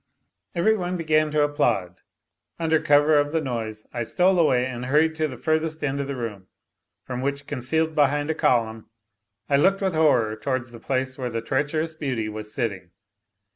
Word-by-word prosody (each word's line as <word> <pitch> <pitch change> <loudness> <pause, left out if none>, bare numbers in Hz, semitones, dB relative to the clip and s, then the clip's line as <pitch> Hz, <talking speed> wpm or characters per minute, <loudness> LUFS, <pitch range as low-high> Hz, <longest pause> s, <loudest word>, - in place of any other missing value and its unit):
Every 215 +6 +3
one 180 -2 -2
began 155 -2 +2
to 150 0 +2
applaud; 110 -11 0 0.6
under 160 -1 +2
cover 145 0 +4
of 145 0 0
the 165 - +1
noise 115 -6 -4
I 120 - -3
stole 180 - +2
away 125 -6 +3
and 125 -1 -5
hurried 155 +4 +3
to 155 -1 -1
the 130 -4 -8
furthest 160 +2 -1
end 140 -1 -1
of 140 - -2
the 140 - -4
room, 105 -6 -6 0.6
from 125 -1 -5
which, 140 +1 -2
concealed 155 +4 -1
behind 145 +1 +2
a - - 0
column, 115 -6 0 0.6
I 140 - +3
looked 195 +6 +3
with 190 -2 0
horror 130 -9 +3
towards 125 +2 -3
the 115 - -11
place 130 +2 -2
where 125 -1 -2
the 115 -1 -4
treacherous 145 +6 -1
beauty 130 -8 -3
was 105 0 -5
sitting. 100 -8 -3
140 Hz, 180 wpm, -24 LUFS, 120-155 Hz, 0.6 s, cover